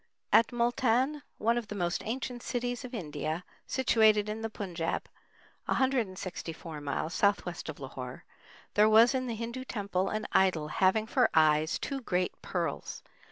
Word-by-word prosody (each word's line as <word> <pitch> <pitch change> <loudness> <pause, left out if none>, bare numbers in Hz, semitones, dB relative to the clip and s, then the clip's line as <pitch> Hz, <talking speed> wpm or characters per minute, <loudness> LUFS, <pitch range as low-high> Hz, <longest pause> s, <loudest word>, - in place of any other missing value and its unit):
At 230 - +7
Multan, 245 +4 +1 0.2
one 230 +2 +2
of 230 - -8
the 210 - -6
most 175 -2 -1
ancient 245 +1 -3
cities 245 0 -2
of 250 - -7
India, 155 -2 -3 0.2
situated 220 -5 +3
in 215 +1 -4
the 225 - -2
Punjab, 175 -6 -3 0.6
164 185 - -2
miles 145 +3 -2
southwest 200 -5 0
of 155 - -6
Lahore, 130 -2 -7 0.5
there 210 +1 +5
was 225 +4 +7
in 255 -1 -1
the 235 - -2
Hindu 235 +3 -5
temple 200 -6 -2
an 215 0 -2
idol 185 -6 +3
having 195 +6 +2
for 250 +2 +3
eyes 155 0 +4
two 275 -1 -4
great 180 -5 0
pearls. 170 -6 -3
210 Hz, 150 wpm, -30 LUFS, 170-240 Hz, 0.6 s, At